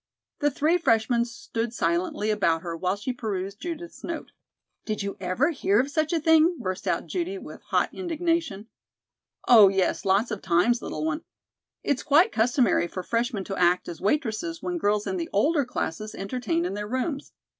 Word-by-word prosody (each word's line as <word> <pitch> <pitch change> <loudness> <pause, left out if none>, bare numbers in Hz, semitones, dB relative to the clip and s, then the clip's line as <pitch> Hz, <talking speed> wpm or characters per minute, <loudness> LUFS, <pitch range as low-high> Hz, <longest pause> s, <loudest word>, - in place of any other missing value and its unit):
The 290 - +3
three 310 +5 +1
freshmen 235 -4 +2
stood 230 0 -5
silently 180 +5 0
about 170 -6 +1
her 170 -2 -4
while 185 +3 -1
she 210 +5 -4
perused 200 -4 -4
Judith's 340 0 -7
note. 335 -2 -5 0.5
"Did 215 -2 -3
you 200 0 -4
ever 190 - +1
hear 210 -9 +2
of 270 +3 0
such 310 +2 0
a 335 - +2
thing?" 320 +2 +4
burst 185 -7 -4
out - - 0
Judy 370 +2 -3
with - - -10
hot - - 0
indignation. 330 - -1 0.8
"Oh, 220 -5 +9
yes, 190 -1 +1
lots 200 +4 +2
of 215 - -4
times, 190 +8 +2
little - - -4
one. 315 0 -1 0.6
It's 280 -3 0
quite 325 +9 +4
customary 235 - +2
for 185 +1 -6
freshmen 230 -1 -1
to 195 - -5
act 180 0 +3
as 170 -2 -7
waitresses 280 - -1
when 355 -1 -3
girls 210 -4 +1
in 375 - -2
the 335 -1 -4
older 295 -3 +2
classes 215 -3 -4
entertain 195 -5 -2
in 180 - -2
their 210 +1 -4
rooms. 260 +5 -3
235 Hz, 175 wpm, -26 LUFS, 195-310 Hz, 0.8 s, Oh